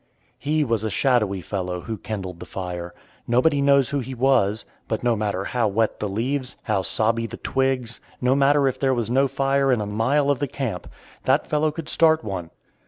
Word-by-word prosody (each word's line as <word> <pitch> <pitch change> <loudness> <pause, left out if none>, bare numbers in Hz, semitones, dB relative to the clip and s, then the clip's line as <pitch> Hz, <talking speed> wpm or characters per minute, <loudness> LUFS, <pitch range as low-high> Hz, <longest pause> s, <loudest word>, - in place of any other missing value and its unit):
He 150 +1 +1
was 115 -5 0
a 110 - -1
shadowy 105 -6 +1
fellow 90 0 -3
who 115 +3 -4
kindled 95 -5 -5
the - - -9
fire. 90 -2 -5 0.3
Nobody 135 +4 +3
knows 140 -1 +4
who 145 - 0
he 130 0 -5
was; 115 -5 +2 0.2
but 110 0 -2
no 120 -1 +3
matter 100 -3 -1
how 120 -3 0
wet 110 +2 0
the 105 - -2
leaves, 125 +6 -2
how 105 -4 0
sobby 115 +4 0
the - - -8
twigs, 130 -3 -1 0.2
no 125 +1 +2
matter 140 0 +4
if 130 - -2
there 135 -1 +2
was 115 -1 -2
no 135 +2 +3
fire 135 0 +1
in 125 - +2
a 105 - -2
mile 130 +8 +1
of 140 - -1
the 145 - -1
camp, 120 -9 -4 0.4
that 135 +3 +3
fellow 155 0 +1
could 155 0 -7
start 160 -3 +3
one. 95 -6 -4
120 Hz, 200 wpm, -23 LUFS, 105-140 Hz, 0.4 s, knows